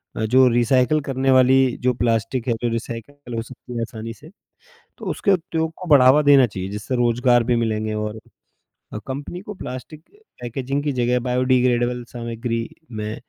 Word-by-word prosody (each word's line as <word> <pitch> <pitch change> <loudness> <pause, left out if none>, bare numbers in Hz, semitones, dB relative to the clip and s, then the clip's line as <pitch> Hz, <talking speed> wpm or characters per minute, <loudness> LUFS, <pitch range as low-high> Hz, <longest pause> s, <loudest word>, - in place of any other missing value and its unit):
अ, 110 - -1
जो 130 +3 +5
रीसाइकल 125 +5 +3
करने 135 -1 0
वाली 130 0 +5 0.3
जो 125 0 +2
प्लास्टिक 115 +1 -1
है, 120 - +2
जो 120 - 0
रीसाइकल 120 +3 -6
हो 115 - -2
सकती 125 +1 -11
है 115 - -2
आसानी 115 0 -6
से, 150 +6 -15 0.7
तो - - -10
उसके 200 - 0
उपयोग 160 -2 -1
को 180 - -8
बढ़ावा 135 +1 +6
देना 140 -3 +6
चाहिए, 95 -2 -6
जिससे 105 +5 -4
रोजगार 120 0 +3
भी 120 0 +1
मिलेंगे 110 -2 -1
और 105 +1 -4 0.7
अ, - - -4
कंपनी 145 +7 -6
को 210 0 -8
प्लास्टिक 130 -1 -8
अ, - - -23 0.2
पैकेजिंग 135 +4 -3
की 145 - 0
जगह 125 0 +1
बायोडिग्रेडेबल 125 -1 +1
सामग्री 115 -1 -4 0.3
में 105 +1 -4
125 Hz, 170 wpm, -21 LUFS, 115-135 Hz, 0.7 s, बढ़ावा